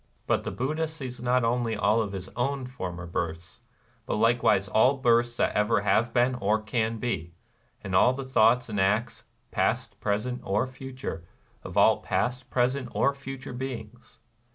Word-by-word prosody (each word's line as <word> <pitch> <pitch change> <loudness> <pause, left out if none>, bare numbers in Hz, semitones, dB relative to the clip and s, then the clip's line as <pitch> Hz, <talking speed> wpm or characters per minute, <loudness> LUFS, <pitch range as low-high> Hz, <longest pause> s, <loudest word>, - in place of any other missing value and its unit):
But - - +1
the - - -3
Buddha 155 +6 -1
sees 130 -6 -7
not 125 0 +2
only 115 -1 0
all 105 +2 +2
of 105 -3 -3
his 95 -1 -5
own 135 +2 -2
for 125 -8 -5
mer 85 0 -7
births, 85 +2 -4 0.5
but - - 0
likewise 115 -3 +3
all 125 +8 +4
births 120 -2 +2
that - - +1
ever 105 0 +2
have 115 +3 +2
been 125 +2 +3
or 110 -3 +1
can 110 +1 -1
be, 85 -8 -3 0.2
— - - -38
and 95 - -5
all 95 +7 +5
the 135 +1 -5
thoughts 125 -1 +3
and 105 -3 -3
acts, 105 +5 0 0.3
past, - - -1
present, 110 +5 -1
or 100 +5 +1
future, 130 -9 -7 0.4
of - - -7
all - - +5
past, 125 +1 -1
present, 125 +1 0
or 140 - +2
future 135 -2 -8
beings. 120 -2 -7
120 Hz, 175 wpm, -27 LUFS, 105-125 Hz, 0.5 s, all